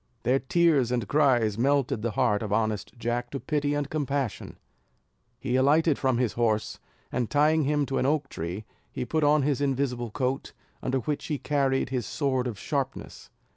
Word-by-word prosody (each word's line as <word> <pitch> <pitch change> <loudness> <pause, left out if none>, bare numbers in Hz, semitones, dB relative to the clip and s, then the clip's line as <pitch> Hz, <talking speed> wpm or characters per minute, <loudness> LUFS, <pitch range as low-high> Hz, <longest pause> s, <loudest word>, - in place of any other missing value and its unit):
Their 130 +3 +3
tears 145 -4 +2
and 120 -5 -1
cries 120 -7 +2
melted 135 -3 +1
the 115 - -1
heart 105 -5 +2
of 105 -3 -4
honest 110 -1 0
Jack 120 +1 -2
to 140 - -4
pity 145 -1 -1
and 145 -1 -1
compassion; 140 -5 -3 0.8
he 125 0 -1
alighted 145 +3 +3
from 130 -3 +1
his 120 -3 0
horse, 110 -3 0 0.3
and 125 -3 -1
tying 150 +1 +3
him 145 0 +1
to 135 0 -1
an 130 - +1
oak 145 -1 +1
tree 90 0 -5 0.3
he - - -4
put 155 +5 0
on 145 0 +4
his 140 0 0
invisible 130 -4 -1
coat, 130 +3 -2 0.3
under 130 +1 0
which 150 +3 -3
he 150 - -1
carried 135 -2 0
his 125 -3 -2
sword 130 -4 0
of 115 -5 -5
sharpness. 135 +2 -4
135 Hz, 175 wpm, -27 LUFS, 120-145 Hz, 0.8 s, on